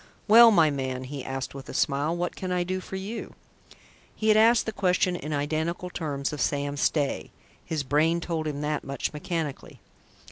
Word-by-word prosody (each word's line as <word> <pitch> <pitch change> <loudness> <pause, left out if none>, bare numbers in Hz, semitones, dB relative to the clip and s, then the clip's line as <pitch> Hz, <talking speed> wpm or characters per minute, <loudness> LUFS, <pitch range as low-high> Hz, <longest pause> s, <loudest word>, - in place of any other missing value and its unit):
"Well, 230 +2 +9
my 165 -8 +4
man," 130 -2 -3
he 135 0 -6
asked 135 0 -4
with 135 0 -9
a - - -7
smile, 145 +4 +1
"what 175 0 -2
can 185 -1 -4
I 180 -1 +1
do 185 +1 -2
for 190 - -8
you?" 200 +5 -6 0.8
He 220 - 0
had 215 - +6
asked 225 +1 +5
the 220 - -2
question 180 -2 +1
in 155 -3 -5
identical 160 +5 -2
terms 145 -5 -3
of 145 - -4
Sam 145 0 -1
Stay 145 0 0 0.3
his 155 -3 -3
brain 155 +5 +2
told 165 -2 -3
him 145 -1 -3
that 150 0 -2
much, 140 +2 -3
mechanically. 155 -1 -4
155 Hz, 185 wpm, -26 LUFS, 145-180 Hz, 0.8 s, Well